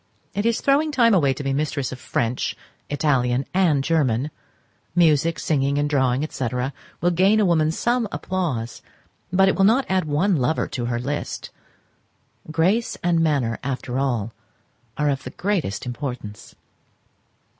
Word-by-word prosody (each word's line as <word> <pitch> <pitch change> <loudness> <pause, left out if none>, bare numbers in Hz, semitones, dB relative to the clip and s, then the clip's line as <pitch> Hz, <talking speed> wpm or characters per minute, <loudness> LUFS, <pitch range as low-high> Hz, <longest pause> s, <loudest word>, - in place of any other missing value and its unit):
It 205 +3 0
is 230 - +1
throwing 290 +3 +2
time 235 -5 +4
away 145 -8 +4
to 145 - -4
be 135 0 -1
mistress 145 -2 -1
of 130 - -7
French, 120 0 -2 0.3
Italian, 135 -3 +1
and 170 -7 +3
German: 140 -3 +1 0.6
music, 165 -1 +3
singing, 140 -2 0
and 145 0 +1
drawing, 135 0 +1
&c., 130 -4 -3 0.5
will 175 - +3
gain 190 +5 +4
a 210 - +4
woman 160 -3 +3
some 235 +7 0
applause, 150 -12 -3 0.5
but 190 +1 +4
will 195 - +2
not 230 +7 +4
add 185 -2 +1
one 160 +5 +1
lover 140 +4 0
to 120 -3 -3
her 120 0 -1
list—grace 160 - -4
and 170 -1 +2
manner, 140 -8 +1
after 130 -1 -3
all, 120 -5 -1 0.6
are 150 -1 +2
of 135 - -2
the - - -6
greatest 175 - -2
importance. 125 -5 -6
150 Hz, 145 wpm, -23 LUFS, 130-185 Hz, 0.6 s, time